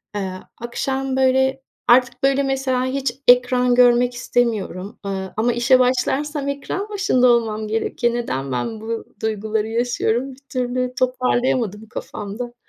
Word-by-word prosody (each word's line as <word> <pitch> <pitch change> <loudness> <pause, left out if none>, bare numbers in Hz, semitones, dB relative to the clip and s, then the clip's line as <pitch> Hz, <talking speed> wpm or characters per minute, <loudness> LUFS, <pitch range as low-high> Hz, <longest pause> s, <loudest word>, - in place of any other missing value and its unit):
Eee, 190 -2 -3 0.3
akşam 265 +2 -2
böyle 265 0 +2 0.3
artık 250 +2 +4
böyle 275 +1 +3
mesela 265 -2 0
hiç 260 -1 -2
ekran 250 0 +5
görmek 245 0 +5
istemiyorum, 215 -6 -2
ııı, 190 -1 -4
ama 235 +2 +2
işe 240 +2 +4
başlarsam 275 +3 0
ekran 330 +9 -4
başında 385 -12 +2
olmam 220 -3 +1
gerekiyor. 230 +2 -1
Neden 135 - -3
ben 215 - -3
bu 225 +1 -4 0.2
duyguları 220 0 -1
yaşıyorum? 240 +2 -1
Bir - - -21
türlü 250 0 -2
toparlayamadım 250 -4 0
kafamda. 225 +5 -6
245 Hz, 130 wpm, -21 LUFS, 220-260 Hz, 0.3 s, ekran